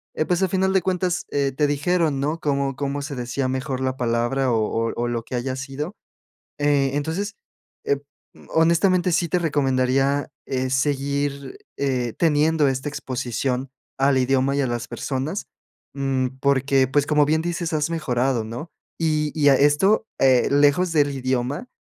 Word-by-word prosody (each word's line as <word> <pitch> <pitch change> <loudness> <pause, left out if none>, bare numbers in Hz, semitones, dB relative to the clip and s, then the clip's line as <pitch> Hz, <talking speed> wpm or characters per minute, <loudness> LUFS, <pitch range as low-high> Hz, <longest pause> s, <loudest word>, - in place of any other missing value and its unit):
Eh, 155 - 0
pues, 180 +2 0
al 190 - +2
final 190 0 +1
de 190 - +3
cuentas, 180 0 -1
eh, 140 -1 +1
te 150 +1 +2
dijeron, 150 0 +1
¿no?, 150 +4 -1
cómo 140 -3 -1
cómo 140 +1 -3
se 140 0 -5
decía 125 +2 -2
mejor 130 0 -3
la 130 0 -1
palabra 120 +2 0
o 115 - +2
o 115 +1 -1
o 120 - -1
lo 120 -1 -2
que 125 - -6
haya 130 +2 -2
sido, 140 +8 -5 0.6
eh, 145 -2 +2
entonces, 165 +9 -2 0.5
eh, 140 - +1 0.5
honestamente, 175 +2 +3
sí 170 +1 +1
te 180 - +1
recomendaría, 135 -2 +1 0.2
eh, 130 -1 -2
seguir, 140 0 -1 0.2
eh, 130 -4 -1
teniendo 155 -1 +3
esta 135 +2 -2
exposición 130 -1 -3 0.3
al 135 0 +4
idioma 135 +1 +2
y 140 - +2
a - - +1
las 120 0 -3
personas. 135 +8 -3 0.5
Mm, 130 -2 -1
porque, 135 -1 +2
pues, 145 +1 +2
como 150 -1 +3
bien 160 +2 +1
dices, 170 -1 -3
has 150 +1 0
mejorado, 130 -7 0
¿no? 120 +9 -7 0.3
Y 155 -2 +1
y 145 -1 +5
a 135 - +6
esto, 170 +11 +3
eh, 130 -2 +4
lejos 145 +5 +3
del 145 -3 +3
idioma 130 - -2
140 Hz, 165 wpm, -23 LUFS, 130-155 Hz, 0.6 s, a